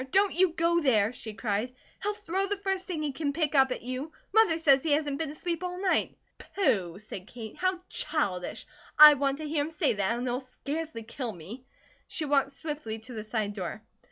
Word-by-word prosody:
Don't 395 Hz, +5 st, +3 dB
you 360 Hz, 0 st, +3 dB
go 340 Hz, +1 st, +2 dB
there," 225 Hz, -6 st, +3 dB
she 220 Hz, -3 st, -8 dB
cried. 225 Hz, +3 st, -2 dB, 0.3 s
"He'll 415 Hz, 0 st, -1 dB
throw 390 Hz, -1 st, -1 dB
the 410 Hz, +1 st, -1 dB
first 385 Hz, -1 st, -2 dB
thing 330 Hz, -5 st, -3 dB
he 295 Hz, -, -1 dB
can 285 Hz, +1 st, -2 dB
pick 310 Hz, -1 st, 0 dB
up 265 Hz, -2 st, +5 dB
at 250 Hz, -, -4 dB
you. 255 Hz, +5 st, -4 dB, 0.2 s
Mother 440 Hz, -7 st, +5 dB
says 280 Hz, -5 st, +5 dB
he 310 Hz, -1 st, +1 dB
hasn't 290 Hz, -2 st, 0 dB
been 320 Hz, -3 st, -1 dB
asleep 335 Hz, +3 st, -3 dB
all 360 Hz, 0 st, -4 dB
night." 380 Hz, -1 st, +1 dB, 0.2 s
"Pooh!" 200 Hz, -, 0 dB
said 200 Hz, -2 st, -9 dB
Kate. 225 Hz, -2 st, -9 dB
"How 370 Hz, -1 st, 0 dB
childish! 200 Hz, -, -2 dB, 0.3 s
I 300 Hz, 0 st, +12 dB
want 275 Hz, -1 st, 0 dB
to 310 Hz, 0 st, -5 dB
hear 295 Hz, -1 st, 0 dB
him 300 Hz, -, -4 dB
say 320 Hz, -4 st, +1 dB
that, 200 Hz, +3 st, 0 dB
and 245 Hz, -, -3 dB
he'll 245 Hz, +1 st, 0 dB
scarcely 280 Hz, +1 st, -5 dB
kill 235 Hz, +1 st, -5 dB
me." 200 Hz, +10 st, -10 dB, 0.4 s
She 315 Hz, -, -2 dB
walked 280 Hz, -1 st, +2 dB
swiftly 295 Hz, -7 st, -5 dB
to 245 Hz, +3 st, -10 dB
the 215 Hz, -2 st, -5 dB
side 215 Hz, -2 st, -2 dB
door. 200 Hz, +2 st, -5 dB
285 Hz, 210 wpm, -29 LUFS, 230-330 Hz, 0.4 s, I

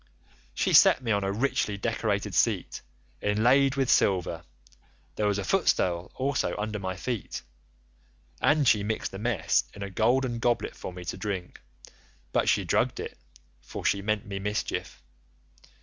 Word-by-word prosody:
She -, -, +1 dB
set 130 Hz, -, +7 dB
me 115 Hz, -, -1 dB
on 100 Hz, -1 st, +1 dB
a 95 Hz, -, 0 dB
richly 105 Hz, -2 st, 0 dB
decorated 105 Hz, -2 st, -1 dB
seat 95 Hz, +2 st, +1 dB, 0.4 s
inlaid 125 Hz, +6 st, +3 dB
with 135 Hz, -2 st, +1 dB
silver, 95 Hz, -6 st, +2 dB, 0.7 s
there 105 Hz, -, 0 dB
was 100 Hz, -1 st, +1 dB
a 100 Hz, -, -2 dB
footstool 90 Hz, -, +1 dB
also 130 Hz, -9 st, -1 dB
under 105 Hz, 0 st, -3 dB
my 95 Hz, -1 st, -3 dB
feet, 115 Hz, +1 st, -4 dB, 1.0 s
and 150 Hz, -2 st, +3 dB
she 105 Hz, -, +5 dB
mixed 105 Hz, 0 st, -3 dB
a 95 Hz, -, -6 dB
mess 115 Hz, +1 st, +1 dB
in 100 Hz, -, -6 dB
a 100 Hz, -, -6 dB
golden 120 Hz, +3 st, +1 dB
goblet 120 Hz, 0 st, 0 dB
for -, -, -7 dB
me 90 Hz, 0 st, -9 dB
to -, -, -4 dB
drink; 95 Hz, -4 st, -5 dB, 0.7 s
but -, -, +2 dB
she -, -, +3 dB
drugged -, -, +1 dB
it, -, -, -6 dB, 0.5 s
for -, -, -8 dB
she 100 Hz, -, +2 dB
meant 105 Hz, +1 st, -1 dB
me 100 Hz, -1 st, -5 dB
mischief. 105 Hz, +2 st, -3 dB
105 Hz, 155 wpm, -27 LUFS, 100-120 Hz, 1.0 s, set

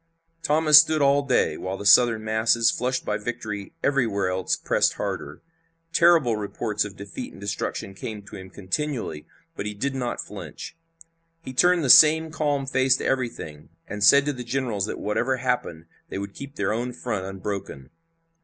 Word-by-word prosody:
Thomas 150 Hz, -1 st, +6 dB
stood 160 Hz, 0 st, +2 dB
all 140 Hz, 0 st, +3 dB
day, 135 Hz, -3 st, 0 dB
while 95 Hz, +1 st, -5 dB
the 100 Hz, -, -8 dB
Southern 110 Hz, +1 st, +5 dB
masses, 110 Hz, +1 st, +2 dB
flushed 130 Hz, +1 st, -2 dB
by 105 Hz, 0 st, -2 dB
victory 105 Hz, -3 st, -6 dB
everywhere 110 Hz, -9 st, 0 dB
else, 95 Hz, 0 st, -1 dB
pressed -, -, +1 dB
harder. -, -, -6 dB, 0.5 s
Terrible 165 Hz, -9 st, +4 dB
reports 105 Hz, +1 st, -2 dB
of 105 Hz, -2 st, -8 dB
defeat 100 Hz, 0 st, -8 dB
and -, -, -13 dB
destruction 100 Hz, -1 st, -4 dB
came 105 Hz, +1 st, -7 dB
to -, -, -12 dB
him 95 Hz, 0 st, -10 dB
continually, 100 Hz, -, -4 dB, 0.3 s
but 100 Hz, -, -5 dB
he 105 Hz, -, -5 dB
did 135 Hz, +7 st, -2 dB
not 125 Hz, -3 st, -3 dB
flinch. -, -, -8 dB, 0.7 s
He 130 Hz, -, -8 dB
turned 175 Hz, +5 st, +3 dB
the -, -, 0 dB
same 160 Hz, +1 st, +7 dB
calm 145 Hz, -3 st, -1 dB
face 130 Hz, -1 st, +2 dB
to -, -, -6 dB
everything, 80 Hz, -, -3 dB, 0.2 s
and 105 Hz, -1 st, -4 dB
said 140 Hz, +7 st, +6 dB
to 145 Hz, -, -1 dB
the 125 Hz, -2 st, -7 dB
generals 115 Hz, -5 st, -2 dB
that -, -, -5 dB
whatever 120 Hz, +5 st, -1 dB
happened 125 Hz, -10 st, -3 dB, 0.2 s
they -, -, -5 dB
would 100 Hz, 0 st, -6 dB
keep 140 Hz, 0 st, -10 dB
their 100 Hz, +1 st, -1 dB
own 120 Hz, +2 st, -3 dB
front 110 Hz, -6 st, -4 dB
unbroken. 95 Hz, -8 st, -6 dB
115 Hz, 170 wpm, -24 LUFS, 100-135 Hz, 0.7 s, same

